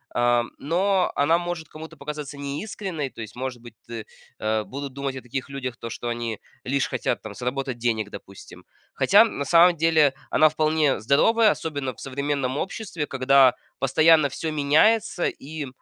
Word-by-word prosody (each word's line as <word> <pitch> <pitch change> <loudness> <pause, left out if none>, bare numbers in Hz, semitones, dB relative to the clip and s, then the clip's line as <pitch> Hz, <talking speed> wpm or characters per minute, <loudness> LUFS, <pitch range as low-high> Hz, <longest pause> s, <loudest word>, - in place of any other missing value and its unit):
а, 120 0 +3
но 185 +5 +1
она 160 +4 +3
может 175 -3 -4
кому-то 160 +1 -11
показаться 150 -1 -6
неискренной, 150 +1 -4
то - - -16
есть, 110 -1 -9
может 125 -1 -5
быть 120 -2 -13
ты 115 -2 -7 0.3
а, 110 0 0
будут 140 +3 -7
думать 135 -1 -4
о - - -7
таких 130 +3 -5
людях, 130 -3 -5
то 115 - -7
что 120 - -6
они 120 -2 -3 0.2
лишь 135 +1 0
хотят, - - -2
там, - - -8
заработать 130 0 -3
денег, 115 -3 -1
допустим. 100 -1 -12 0.3
Хотя, - - +5
на 140 - -3
самом 175 +3 +6
деле, 160 -3 +3 0.2
она 155 - +5
вполне 155 -5 +1
здоровая, 210 - +4
особенно 145 -5 -4
в - - -19
современном 140 -1 -2
обществе, 190 -4 -4
когда 135 -1 +4 0.3
постоянно 155 +2 +4
всё 160 +4 -4
меняется, 155 +7 +3
и, 150 0 -6
140 Hz, 165 wpm, -24 LUFS, 125-160 Hz, 0.3 s, самом